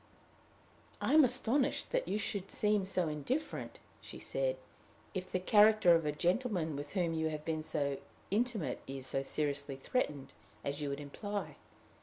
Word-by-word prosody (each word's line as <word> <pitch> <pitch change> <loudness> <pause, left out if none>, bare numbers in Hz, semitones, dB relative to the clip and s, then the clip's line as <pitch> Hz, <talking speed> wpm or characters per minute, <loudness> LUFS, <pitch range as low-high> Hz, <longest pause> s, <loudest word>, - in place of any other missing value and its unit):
"I - - +1
am 310 0 +8
astonished 255 - +2
you - - 0
should 200 -2 -3
seem 210 -2 +2
so 180 -3 +1
indifferent," 155 - -3 0.2
she - - -9
said, - - -1 0.6
"if 185 -2 -4
the 185 - +1
character 210 -1 +6
of 165 -2 +2
a - - +2
gentleman 175 - 0
with 145 +1 -6
whom 175 -4 +1
you 160 0 0
have 155 -1 -5
been 160 -1 -1
so 140 -3 -1 0.3
intimate 210 - 0
is 135 -1 -5
so 135 +1 -1
seriously 140 -1 -1
threatened 140 - -2 0.3
as 140 +1 -3
you 145 - -1
would 140 +1 -3
imply. 205 +8 -5
175 Hz, 155 wpm, -34 LUFS, 145-215 Hz, 0.6 s, am